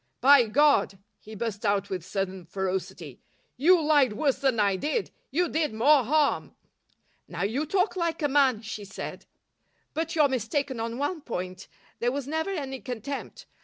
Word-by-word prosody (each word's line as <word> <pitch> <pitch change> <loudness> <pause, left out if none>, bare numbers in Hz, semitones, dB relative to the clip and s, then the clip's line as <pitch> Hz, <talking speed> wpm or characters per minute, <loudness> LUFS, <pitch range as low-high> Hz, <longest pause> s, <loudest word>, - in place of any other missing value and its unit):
By 270 -2 +6
God!" 260 -5 +3 0.2
he 215 +1 -11
burst 215 -1 -4
out 200 -1 0
with 185 -3 -3
sudden 190 0 -3
ferocity, 185 -6 -4 0.3
"you 340 +8 +5
lied 295 -6 +3
worse 275 +4 0
than 265 -5 +1
I 200 -2 +3
did. 310 - -2 0.2
You 350 +4 +1
did 305 -7 -1
more 275 +4 +5
harm." 295 +3 +1 0.7
"Now 170 +1 -4
you 255 +10 -1
talk 380 +4 +1
like 335 -3 -2
a - - +4
man," 265 -5 +3
she 220 -1 -6
said. 195 0 -8 0.7
"But 325 +1 -2
you're 300 -3 +5
mistaken 260 +1 -2
on 230 +1 -3
one 295 +4 -2
point. 185 -6 -6 0.3
There 240 +1 +1
was 275 0 -4
never 320 +4 -2
any 275 -8 -4
contempt. 255 +3 -6
260 Hz, 165 wpm, -27 LUFS, 205-300 Hz, 0.7 s, By